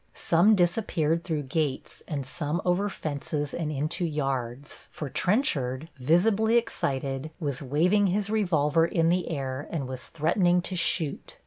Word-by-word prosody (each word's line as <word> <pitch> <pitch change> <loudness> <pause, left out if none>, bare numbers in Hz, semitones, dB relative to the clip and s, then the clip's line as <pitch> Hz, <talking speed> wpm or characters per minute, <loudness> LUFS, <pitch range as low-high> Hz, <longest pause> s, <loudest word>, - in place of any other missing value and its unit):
Some 180 +6 +4
disappeared 170 -3 +1
through 160 -5 -2
gates 140 0 -2
and 140 -4 -3
some 150 +3 -3
over 185 +3 +2
fences 145 -3 -4
and 160 -3 -2
into 155 +5 -2
yards, 135 -4 -3
for 150 -4 -6
Trenchard, 160 - 0
visibly 205 - +3
excited, 135 - -2
was 140 -6 -3
waving 175 +10 +2
his 200 +2 0
revolver 165 -7 +2
in 165 -1 +2
the 180 +1 +1
air 135 -3 -3
and 145 -6 -3
was 130 -1 -6
threatening 175 +3 +2
to 185 - -4
shoot. 170 -3 0
160 Hz, 140 wpm, -27 LUFS, 140-180 Hz, -, Some